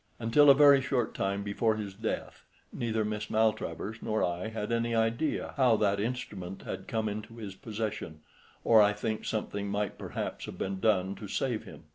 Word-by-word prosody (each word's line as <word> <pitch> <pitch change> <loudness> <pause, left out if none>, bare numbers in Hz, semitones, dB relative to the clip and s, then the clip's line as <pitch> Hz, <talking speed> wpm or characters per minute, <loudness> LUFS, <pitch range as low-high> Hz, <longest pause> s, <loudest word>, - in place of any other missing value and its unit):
Until 120 +6 +5
a 140 - +9
very 140 -1 +7
short 130 -3 0
time 100 +1 -1
before 110 +2 +1
his 105 -3 -5
death 110 +3 -4 0.3
neither 110 -2 -1
Miss 105 0 -3
Maltravers 110 -1 0
nor 110 0 0
I 90 +4 -1
had 110 0 -4
any 115 0 0
idea 115 +7 0
how 125 -4 +5
that 100 -2 +2
instrument 100 -5 -4
had 95 - -6
come 110 -1 -1
into 105 +2 -6
his 105 -4 -6
possession, 105 -7 -5 0.4
or 110 -2 +7
I 105 0 +4
think 110 +1 -3
something 100 -2 -2
might 100 -1 -2
perhaps - - -4
have - - -8
been 95 0 -3
done 95 -3 +2
to 105 - -8
save 115 +2 -2
him. - - -12
110 Hz, 180 wpm, -30 LUFS, 100-115 Hz, 0.4 s, a